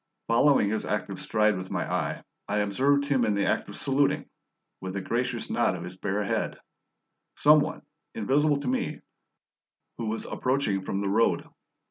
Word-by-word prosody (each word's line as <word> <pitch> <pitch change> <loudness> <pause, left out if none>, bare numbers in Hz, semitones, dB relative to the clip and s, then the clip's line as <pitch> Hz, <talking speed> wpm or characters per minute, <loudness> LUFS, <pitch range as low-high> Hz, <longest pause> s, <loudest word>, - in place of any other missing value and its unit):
Following 115 -2 +4
his 110 - -1
active - - -3
stride 105 -1 +2
with 90 0 -6
my - - -2
eye, - - -2 0.2
I 105 - -1
observed 135 +8 +2
him 140 -3 +2
in 105 -2 +1
the 100 - +1
act - - 0
of - - -7
saluting, 140 +1 +1 0.5
with 95 0 -6
a 100 - -2
gracious 120 +3 -2
nod 120 -5 +1
of 85 - -6
his 90 +1 -8
bare 100 +2 -2
head, 100 - -1 0.8
some 150 +1 +6
one, 145 - -3 0.3
invisible 140 +6 +2
to 140 - -5
me, 130 - -1 1.0
who 115 - -2
was 110 +1 -3
approaching 125 -7 0
from 95 - -2
the 100 - -1
road. 110 +4 +2
115 Hz, 170 wpm, -27 LUFS, 100-135 Hz, 1.0 s, some